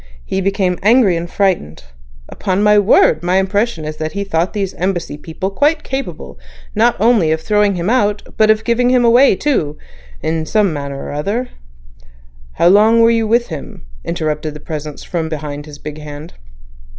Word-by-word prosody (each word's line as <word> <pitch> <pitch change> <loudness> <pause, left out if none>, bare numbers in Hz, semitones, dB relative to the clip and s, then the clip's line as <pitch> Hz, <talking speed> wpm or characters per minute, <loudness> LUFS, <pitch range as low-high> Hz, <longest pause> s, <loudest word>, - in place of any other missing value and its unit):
He 190 - -2
became 190 -2 0
angry 215 -3 +4
and 170 +1 -4
frightened. 185 - -1 0.4
Upon 195 0 -2
my 210 0 +5
word, 190 -6 +4
my 180 +2 +1
impression 195 -3 0
is 155 0 -6
that 155 0 -4
he 200 0 -2
thought 175 -2 -1
these 200 -3 -2
Embassy 180 -4 -3
people 165 +6 -5
quite 295 +9 +1
capable 270 0 -6 0.3
not 230 +3 +2
only 220 -6 +3
to 160 - +2
throw 210 +5 0
him 190 -4 0
out 210 -3 +1
but, 215 - +4
to 215 - +6
give 225 +2 -2
him 250 0 +3
away 240 +1 +5
too 160 - -1 0.5
in 160 0 -2
some 205 -3 +1
manner 140 -2 -5
or - - -6
other—" 205 - -2 1.0
"How 170 - +3
long 215 +4 +5
were 230 - +5
you 225 -1 +1
with 235 +2 +1
him," 150 - -8 0.2
interrupted 155 -2 -3
the - - -8
Presence 150 -1 -7
from 165 -2 -3
behind 145 -1 -6
his 145 -1 -10
big 150 +1 -8
hand. 150 +2 -9
190 Hz, 175 wpm, -16 LUFS, 155-215 Hz, 1.0 s, to